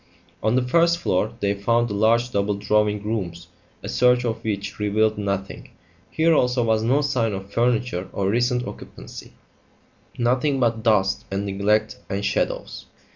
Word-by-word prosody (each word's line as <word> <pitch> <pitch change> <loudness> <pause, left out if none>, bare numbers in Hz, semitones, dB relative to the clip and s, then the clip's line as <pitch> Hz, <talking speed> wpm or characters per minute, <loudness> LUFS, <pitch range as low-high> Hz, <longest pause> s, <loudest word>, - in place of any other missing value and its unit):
On 110 +2 +1
the 130 - +2
first 170 +4 +3
floor 95 - 0
they 100 0 +1
found 115 +4 +1
the 105 - -4
large 115 +4 +2
double 100 -1 0
drawing 105 0 +1
rooms, 90 -6 -4 0.3
a - - -5
search 125 0 +3
of 115 -2 -3
which 105 -2 -4
revealed 105 +1 +1
nothing. 100 -1 -4 0.4
Here 165 +1 +2
also 125 -4 +2
was 110 -1 +2
no 130 +6 +2
sign 125 -7 0
of 95 +1 -7
furniture 120 -6 0
or 95 - -2
recent 120 +3 +1
occupancy; - - -10 0.8
nothing 130 +4 +1
but 115 -2 +1
dust 105 -4 +1
and 100 +1 -2
neglect 105 +2 0
and 100 +1 -2
shadows. - - -2
110 Hz, 155 wpm, -23 LUFS, 100-125 Hz, 0.8 s, first